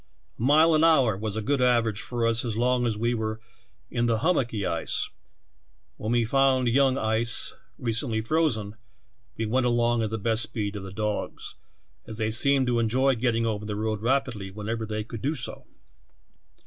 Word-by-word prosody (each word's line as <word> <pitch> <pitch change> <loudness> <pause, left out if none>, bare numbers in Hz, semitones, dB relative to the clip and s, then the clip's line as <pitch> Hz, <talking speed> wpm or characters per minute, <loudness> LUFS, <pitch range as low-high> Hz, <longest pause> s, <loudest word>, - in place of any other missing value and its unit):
A - - -7
mile 155 +6 +5
an 155 0 +3
hour 135 -10 +4
was 105 +1 -4
a 110 - -2
good 140 +2 0
average 115 -4 +2
for 120 -2 -2
us 115 0 +2
as 115 -3 -3
long 125 0 +2
as 110 -2 -1
we 120 +2 0
were 110 -1 -3 0.5
in 120 -1 0
the 115 -1 +2
hum 165 +10 +2
mocky 115 -7 -1
ice; - - -2 0.9
when 110 - -3
we 120 -1 +2
found 130 +1 +2
young 135 +2 +3
ice 110 -1 0 0.2
recently 115 -1 -1
frozen, 115 -5 0 0.6
we 110 - -1
went 125 +3 +1
along 120 -1 +2
at 110 - -1
the 110 - -3
best 110 +1 +1
speed 105 -3 -2
of 105 - -5
the 95 - -8
dogs, 105 +1 -4 0.5
as 110 - -7
they 110 -1 -1
seemed 135 +3 +4
to 120 -1 +1
enjoy 130 +4 +2
getting 115 -1 0
over 105 -2 -2
the 105 -1 -4
road 110 0 -2
rapidly 120 -5 -1
wherever 110 +3 -4
they 110 0 -3
could 115 0 -8
do 150 +4 -1
so. 130 - -5
115 Hz, 185 wpm, -26 LUFS, 110-125 Hz, 0.9 s, mile